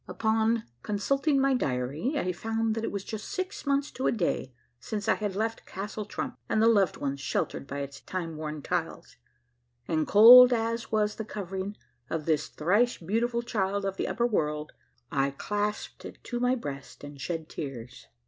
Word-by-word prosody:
Upon 225 +1 +1 0.2
consulting 275 - +1
my 270 0 +3
diar3' 145 - -1
I 185 -9 0
found 225 +4 -1
that 225 0 -3
it - - -2
was 200 -1 -4
just 215 0 -6
six 370 -5 -4
months 280 0 +1
to 260 - -2
a - - +3
da3' 175 - -1 0.3
since 205 - -4
I - - +5
had 205 -3 -3
left 225 +2 -2
Castle 205 +2 -5
Trump 255 +4 -5
and - - +2
the 220 - +5
loved 200 -6 +3
ones 140 0 -3
sheltered 140 0 -2
b3' 140 +1 -3
its 140 0 -8
time 170 -3 -4
worn 155 -1 -5
tiles, 175 -7 -3 0.7
and 155 -2 0
cold 245 +4 +10
as 230 0 -1
was 210 -1 +1
the 220 - -3
covering 195 -1 -5 0.3
of 160 -2 -3
this 155 -2 +1
thrice 205 +10 +2
beautiful 235 +7 -1
child 200 -3 -1
of 195 0 -2
the - - -1
upper 235 - 0
world 150 -9 -1 0.4
I 135 0 +2
clasped 210 0 -3
it - - -9
to 240 - -3
my 250 +1 +2
breast 140 - -7
and 145 -1 -9
shed 160 +2 -3
tears. 125 - -7
205 Hz, 180 wpm, -28 LUFS, 155-230 Hz, 0.7 s, cold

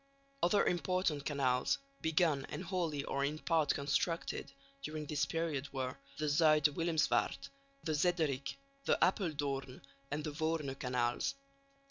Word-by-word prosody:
Other 200 +4 +4
important 175 -4 +1
canals, 135 - +2 0.2
begun 160 -4 +2
and - - -4
wholly 170 -6 -1
or 140 0 -1
in 145 +2 0
part 160 -2 +2
constructed, 140 +2 -1 0.3
during 155 +2 -4
this 150 0 0
period 160 -4 -2
were 130 -2 -2 0.2
the 155 - -1
Zuid 150 0 +5
Willemsvaart, 165 0 +1 0.3
the 160 - -1
Zederik, 150 -4 +1 0.3
the - - +3
Appeldoorn 145 -8 0 0.3
and 150 +1 -2
the 150 - -3
Voorne 155 -2 -1
canals. 125 - 0
150 Hz, 125 wpm, -35 LUFS, 140-165 Hz, 0.3 s, Zuid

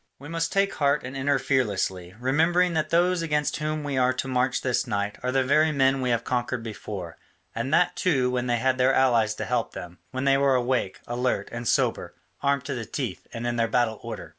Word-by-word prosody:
We 145 +3 -11
must 165 0 -1
take 195 0 +2
heart 140 0 +1
and 130 +2 -7
enter 140 +1 +1
fearlessly, 100 -9 -1
remembering 165 +7 +2
that 155 -1 0
those 175 +1 +2
against 150 -3 0
whom 155 +1 -2
we 140 -2 -2
are 130 0 +3
to 130 - -3
march 125 0 0
this 130 -2 0
night 100 0 -2
are 125 - -1
the 135 0 +2
very 155 +4 +3
men 135 -2 +2
we 125 - 0
have 120 -1 +1
conquered 120 -1 -2
before, 100 -6 -7 0.4
and 120 +4 -3
that 175 +3 +3
too 130 -8 +1
when 125 0 -1
they 120 -1 +1
had 130 +2 +1
their 130 +1 +4
allies 115 -5 +3
to - - -4
help 125 -2 -1
them, 90 0 -8
when 130 0 -4
they 135 0 +4
were 140 -1 +3
awake, 125 -6 -1
alert, 125 +1 -1
and 120 0 -5
sober, - - 0 0.3
armed 140 -1 +1
to 140 - -3
the 120 -3 -4
teeth, 120 -5 -5
and 120 0 -5
in 120 0 -1
their 115 0 +2
battle 115 -2 +1
order. - - -7
130 Hz, 220 wpm, -25 LUFS, 120-140 Hz, 0.4 s, their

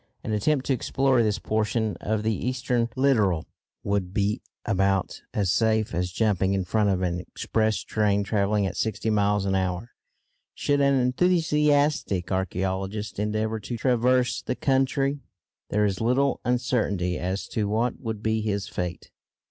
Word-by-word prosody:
An 110 - -4
attempt 130 +6 +1
to 135 - +2
explore 130 0 +2
this 105 -2 +1
portion 110 +1 -1
of 110 0 -1
the 110 0 +1
eastern 125 0 -1
littoral 110 - +2 0.4
would 100 -2 -1
be 105 +1 0 0.2
about 95 -2 0
as 100 -4 0
safe 110 -1 +1
as 90 +1 -1
jumping 100 -2 +1
in 95 -2 -1
front 105 +2 +1
of 95 -1 0
an 85 -1 -1
express 110 +4 -1
train 105 -2 +1
travelling 100 0 +1
at 95 - -3
sixty 110 0 -1
miles 105 -1 +2
an 95 - 0
hour. 95 +4 -1 0.6
Should 145 0 +1
an 140 0 +4
enthusiastic 145 - +2
archæologist 95 +3 -2
endeavour 110 +1 -1
to 120 +3 -5
traverse 125 +1 +2
the 125 - -3
country, 135 +1 +1 0.5
there 105 0 +2
is 100 -1 -1
little 130 +4 +2
uncertainty 110 -8 0
as 95 +2 -3
to 105 -2 -1
what 115 +4 0
would 110 -3 -5
be 110 0 +1
his 100 -2 -2
fate. 90 -5 -5
110 Hz, 150 wpm, -25 LUFS, 100-125 Hz, 0.6 s, an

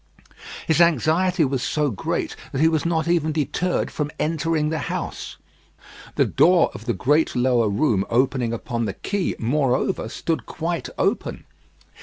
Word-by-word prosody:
His 160 +1 +3
anxiety 170 +2 +3
was 135 -2 -1
so 150 0 0
great 100 - -3 0.2
that 135 - -3
he 160 - +6
was 160 0 +1
not 165 -1 0
even 165 -2 +1
deterred 160 +4 -1
from 150 -1 -2
entering 155 -1 0
the 160 0 -2
house. - - -5 0.8
The - - +3
door 175 0 +4
of 110 - -10
the 120 - 0
great 150 +5 +2
lower 125 -3 +2
room 100 -3 +1
opening 125 -1 +1
upon 115 0 -3
the 100 -2 -4
Quay, 200 -3 -2
moreover, 135 +7 0
stood 160 -8 -3
quite 170 +1 -3
open. - - -1
150 Hz, 150 wpm, -23 LUFS, 125-165 Hz, 0.8 s, he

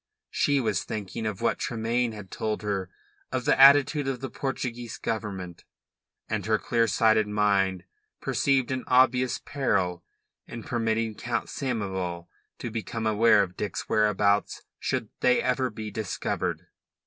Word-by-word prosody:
She 145 -1 +2
was 110 -7 0
thinking 110 +1 -4
of 105 -1 -4
what 115 - +1
Tremayne 115 +1 -1
had 105 -3 -10
told 110 -1 -3
her 100 -3 -2 0.4
of - - -2
the - - +3
attitude 140 +1 +6
of 135 -2 -2
the 135 -2 -6
Portuguese 120 -3 -4
Government, 95 -6 -4 0.6
and - - -2
her - - +3
clear 115 -1 +1
sighted 110 -1 +3
mind 100 -3 +1 0.4
perceived 135 -2 +1
an 130 -1 -2
obvious 130 0 +3
peril 90 -11 -1 0.4
in 115 -1 -7
permitting 115 -1 -1
Count 120 +2 -3
Samoval 95 - -3 0.3
to 120 - -5
become 115 0 -4
aware 110 -1 +5
of 90 -2 -7
Dick's 100 -2 -4
whereabouts 105 -1 +2 0.2
should - - -2
they 125 0 +4
ever 130 0 0
be 110 -1 -7
discovered. 110 -5 -3
110 Hz, 140 wpm, -27 LUFS, 105-125 Hz, 0.6 s, attitude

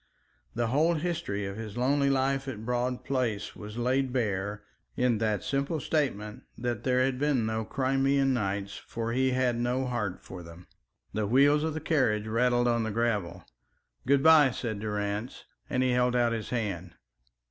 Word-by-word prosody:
The 115 -1 0
whole 155 +7 +3
history 155 - -2
of 100 +1 -5
his 110 -1 -7
lonely 140 +3 +2
life 135 0 +1
at 110 -5 -6
Broad 125 +1 -1
Place 120 -7 -1
was 105 +2 -9
laid 130 +2 +1
bare 105 -4 -2 0.3
in 125 -3 +2
that 110 -4 0
simple 140 +3 -1
statement 115 -9 -1 0.2
that 120 0 -3
there 130 -1 +2
had 130 -1 -1
been 140 -5 +1
no 110 0 -1
Crimean 135 +2 +1
nights 100 -3 -2
for 115 0 -4
he 130 +1 +2
had 125 -2 +1
no 125 +2 0
heart 105 -7 -2
for 90 - -10
them. 85 +1 -12 0.5
The 105 -1 -1
wheels 140 +6 +4
of 160 -1 -1
the - - -2
carriage 130 -10 +1
rattled 120 +2 +2
on 120 -1 +2
the 110 - -1
gravel. 105 -5 -1 0.6
"Good 140 0 +4
bye," 160 -4 +7
said 115 -4 -4
Durrance, 105 +2 -3 0.2
and 130 0 +1
he 130 - +2
held 125 0 +2
out 120 -1 +2
his 110 -2 -4
hand. 95 -8 -3
120 Hz, 170 wpm, -29 LUFS, 105-135 Hz, 0.6 s, bye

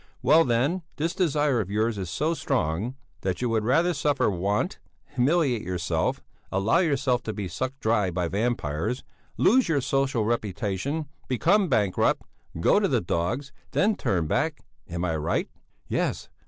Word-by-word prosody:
Well, 160 +2 +6
then, 135 +10 +1
this 165 +4 -1
desire 150 - +2
of 95 - -5
yours 110 +1 0
is 95 -3 -4
so 155 - 0
strong, 120 - -1 0.3
that 95 -2 -2
you 125 - 0
would 110 -1 +1
rather 165 +10 +3
suffer 145 -6 +1
want, 100 - -1 0.3
humiliate 130 -2 +2
yourself, 90 -3 -1 0.3
allow 100 - +2
yourself 135 -7 +1
to 110 - -4
be 100 -3 -4
sucked 130 +10 -4
dry 110 -4 +2
by 90 0 -1
vampires, 100 - -1 0.3
lose 255 -2 +4
your 155 -3 +3
social 135 -3 0
reputation, 110 - -2 0.2
become 175 - +2
bankrupt, 105 -7 +2 0.4
go - - +4
to - - +2
the - - +2
dogs 120 +12 -2 0.2
than 215 +2 +3
turn 85 - 0
back. - - -1 0.2
Am 85 +1 -2
I 80 -2 0
right?" 75 - -1 0.4
"Yes! - - -1
120 Hz, 155 wpm, -26 LUFS, 95-145 Hz, 0.4 s, Well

